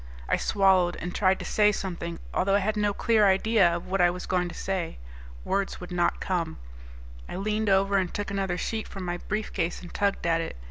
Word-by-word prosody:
I - - +3
swallowed 190 -3 +3
and 175 0 -5
tried 190 -1 +3
to - - -7
say 210 -1 +4
something, 170 -4 -4 0.2
although 195 +2 +2
I 200 -1 +1
had 215 +1 0
no 210 -1 +1
clear 215 0 +3
idea 195 0 +4
of 170 - -5
what 190 0 0
I 175 - +6
was 180 +1 -5
going 180 -1 0
to - - -9
say. 190 -4 -3 0.5
Words 195 0 -1
would 180 0 -9
not 175 -1 +1
come. 170 -3 -2 0.7
I - - -5
leaned 210 +2 -1
over 195 +1 +3
and 185 -2 0
took 205 0 -4
another 195 -3 -1
sheet 220 +3 -3
from 190 -2 -7
my 175 0 -2
briefcase 190 -4 -3
and 175 - -11
tugged 200 -3 0
at 165 -1 +2
it. 165 - -5
190 Hz, 215 wpm, -27 LUFS, 175-200 Hz, 0.7 s, I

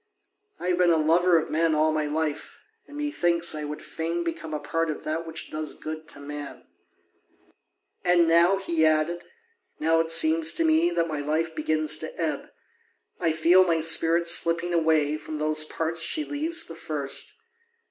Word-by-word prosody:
I 180 - -3
have 180 0 0
been 180 -1 +4
a 165 - +4
lover 170 +3 +3
of 160 - -2
men 160 0 +2
all 155 +1 +2
my 155 -1 -1
life, 155 0 -3 0.3
and 290 - -11
methinks 175 - 0
I 150 -1 -5
would 150 +1 -7
fain 165 +1 -3
become 165 -1 -5
a 150 - -3
part 165 +3 -2
of 155 - -5
that 165 +2 -3
which 160 - -6
does 155 0 -4
good 155 0 -7
to - - -8
man. 145 0 -8 1.4
And 175 -1 +4
now," 170 +4 +4
he 170 -4 -1
added, 155 +2 +1 0.6
"now 165 +1 +2
it 165 0 0
seems 320 - +3
to 330 - +1
me 320 +1 +3
that 170 - 0
my 155 -2 -4
life 155 +3 -1
begins 155 0 -1
to - - -8
ebb; - - -2 0.7
I 165 -3 +1
feel 170 +4 +5
my 165 -3 +1
spirit 165 +1 +3
slipping 170 0 +2
away 155 -3 +2
from 155 0 -7
those 155 0 +1
parts 160 +1 -2
she 310 - 0
leaves 315 +4 -1
the 165 - -9
first. 145 -4 -4
165 Hz, 180 wpm, -25 LUFS, 155-175 Hz, 1.4 s, feel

